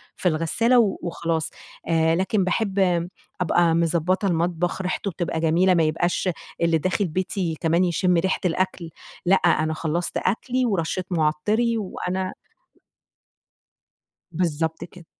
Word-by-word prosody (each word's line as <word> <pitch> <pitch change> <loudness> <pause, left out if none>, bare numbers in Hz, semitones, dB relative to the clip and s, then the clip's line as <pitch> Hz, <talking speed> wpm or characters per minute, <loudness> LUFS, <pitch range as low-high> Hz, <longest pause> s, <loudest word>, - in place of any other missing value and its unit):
في 180 - +1
الغسّالة 195 +10 +2
و 210 -5 +2
وخلاص. 165 -2 -2 0.4
آآ 165 -1 +3
لكن 190 +2 +1
باحِب 200 +1 0
م 175 -3 +2 0.3
أبقى 170 -1 +3
مضبّطة 170 +3 +1
المطبخ، 175 +1 0
ريحته 185 +1 -2
بتبقى 170 -1 -3
جميلة 170 +3 +3
ما 170 - +3
يبقاش 175 +4 0 0.3
اللي 170 -1 +3
داخل 185 +5 0
بيتي 180 0 -2
كمان 165 +2 +2
يشِم 180 +1 +1
ريحة 190 +3 +1
الأكل 180 -1 -1 0.4
لأ، 185 +2 +5
أنا 160 -3 +2
خلّصت 165 +2 -2
أكلي 255 +4 0
ورشّيت 185 -4 -1
مُعطِّري 180 +9 +1
وأنا 185 -2 -3 2.0
بالضبط 160 -1 -1
كده. 175 -2 -15
175 Hz, 125 wpm, -23 LUFS, 165-190 Hz, 2.0 s, لأ